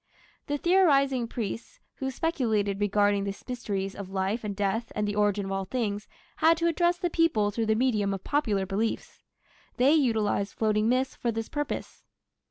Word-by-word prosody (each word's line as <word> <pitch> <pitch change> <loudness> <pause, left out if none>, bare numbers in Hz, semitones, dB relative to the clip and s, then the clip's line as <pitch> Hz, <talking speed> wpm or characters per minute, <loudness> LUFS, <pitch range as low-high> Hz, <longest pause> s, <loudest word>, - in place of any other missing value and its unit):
The 290 0 -1
theorizing 275 -8 +3
priests, 230 -1 -5 0.2
who 265 - -2
speculated 220 - 0
regarding 205 0 +2
the 200 0 -4
mysteries 200 -6 -3
of 200 -2 -8
life 195 +4 -1
and 205 -2 -3
death 205 +4 -1
and 210 0 0
the 205 - -1
origin 205 -1 +1
of 195 - -5
all 195 0 -2
things, 210 -2 -2 0.3
had 325 +1 +4
to 335 - -1
address 345 +1 +2
the 350 -2 -2
people 260 -13 +2
through 225 +1 -2
the 220 - +3
medium 215 -5 +1
of 195 -1 -4
popular 215 -10 0
beliefs. 210 +4 -3 0.6
They 265 +4 +5
utilized 220 -8 +1
floating 215 0 +1
myths 260 +2 +1
for 235 - -1
this 225 0 -4
purpose. 295 0 -4
220 Hz, 175 wpm, -27 LUFS, 205-265 Hz, 0.6 s, They